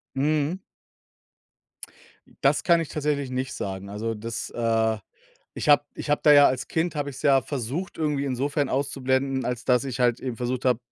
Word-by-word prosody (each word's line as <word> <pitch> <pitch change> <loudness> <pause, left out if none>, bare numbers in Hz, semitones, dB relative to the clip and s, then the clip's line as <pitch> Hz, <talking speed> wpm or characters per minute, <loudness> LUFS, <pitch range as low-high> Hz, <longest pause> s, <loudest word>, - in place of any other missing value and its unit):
Mhm. 150 +4 +1 1.9
Das - - +3
kann 170 -1 +4
ich 165 - -4
tatsächlich 145 -3 -2
nicht 130 +1 -3
sagen. 95 0 -5
Also, 110 +3 -3
das, 115 +2 -5
äh, 115 -1 +1 0.6
ich - - -4
habe 145 0 +6
ich - - -7
habe 145 - +2
da 150 - +7
ja 145 -1 +8
als 130 0 -1
Kind 165 0 -1
habe 145 -1 -2
ich's 130 -1 -10
ja 135 -3 +4
versucht 140 +8 -4
irgendwie 150 -3 0
insofern 140 +2 -1
auszublenden, 135 -1 0
als 125 -1 -3
dass 125 -1 +3
ich 130 -2 -4
halt 120 -1 +2
eben 125 -3 -4
versucht 125 +2 -3
habe 125 -3 +3
135 Hz, 175 wpm, -25 LUFS, 120-145 Hz, 1.9 s, ja